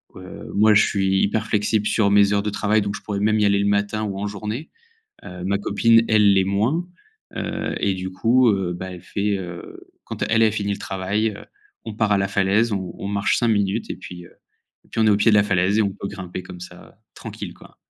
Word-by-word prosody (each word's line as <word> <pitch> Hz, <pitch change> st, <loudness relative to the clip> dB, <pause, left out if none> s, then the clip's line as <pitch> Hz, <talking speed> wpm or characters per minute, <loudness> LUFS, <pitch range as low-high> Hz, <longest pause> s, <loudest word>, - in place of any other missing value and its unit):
heu, 95 Hz, 0 st, -10 dB
moi, 105 Hz, +1 st, +5 dB
je 105 Hz, -, +5 dB
suis 95 Hz, -2 st, +1 dB
hyper 105 Hz, +2 st, 0 dB
flexible 105 Hz, 0 st, 0 dB
sur 100 Hz, -3 st, +2 dB
mes 100 Hz, 0 st, +5 dB
heures 100 Hz, 0 st, +1 dB
de 105 Hz, -, -1 dB
travail 105 Hz, +1 st, +1 dB
donc 100 Hz, +1 st, -3 dB
je -, -, -8 dB
pourrais 100 Hz, -2 st, -4 dB
même 110 Hz, +1 st, +2 dB
y 105 Hz, -, +3 dB
aller 100 Hz, 0 st, +3 dB
le 100 Hz, -, +1 dB
matin 100 Hz, +1 st, 0 dB
ou 100 Hz, -2 st, -4 dB
en 105 Hz, -, -2 dB
journée, 105 Hz, +8 st, -5 dB, 0.6 s
heu, 90 Hz, 0 st, -8 dB
ma 100 Hz, +1 st, +1 dB
copine, 115 Hz, +3 st, +3 dB
elle 105 Hz, -2 st, +5 dB
l'est 95 Hz, -1 st, +3 dB
moins, 115 Hz, -, 0 dB, 0.5 s
heu -, -, -3 dB
et 100 Hz, -1 st, +1 dB
du 95 Hz, 0 st, -5 dB
coup, 120 Hz, +6 st, +3 dB
heu, 95 Hz, -3 st, -1 dB
bah, 95 Hz, +1 st, -7 dB
elle 90 Hz, -, -10 dB
fait, 100 Hz, +2 st, -1 dB
heu, 90 Hz, -2 st, -9 dB, 0.2 s
quand -, -, -7 dB
elle 115 Hz, 0 st, +3 dB
elle 110 Hz, -, +4 dB
finit 100 Hz, -1 st, -2 dB
le 100 Hz, -, -5 dB
travail, 100 Hz, +3 st, -2 dB
heu, -, -, -12 dB, 0.4 s
on 110 Hz, -2 st, -6 dB
part 105 Hz, -1 st, +1 dB
à 100 Hz, -, +3 dB
la 100 Hz, -, 0 dB
falaise, 100 Hz, +3 st, +1 dB
on 95 Hz, -3 st, -4 dB
on 100 Hz, -, -5 dB
marche 100 Hz, 0 st, +1 dB
5 120 Hz, -, +1 dB
minutes 100 Hz, 0 st, 0 dB
et -, -, -4 dB
puis 90 Hz, -1 st, -10 dB
heu -, -, -18 dB, 0.5 s
et -, -, -26 dB
puis -, -, -3 dB
on 110 Hz, -, +4 dB
est -, -, +5 dB
au 100 Hz, -, +4 dB
pied 110 Hz, +3 st, +3 dB
de -, -, +6 dB
la 105 Hz, -, +5 dB
falaise 95 Hz, +1 st, +1 dB
et 110 Hz, -, +4 dB
on 100 Hz, -, 0 dB
peut 100 Hz, -, -7 dB
grimper 95 Hz, -2 st, -7 dB
comme 90 Hz, -, -10 dB
ça, 90 Hz, -, -11 dB
heu, -, -, -22 dB, 0.2 s
tranquille, -, -, -8 dB
quoi. -, -, -18 dB
100 Hz, 250 wpm, -22 LUFS, 95-110 Hz, 0.6 s, de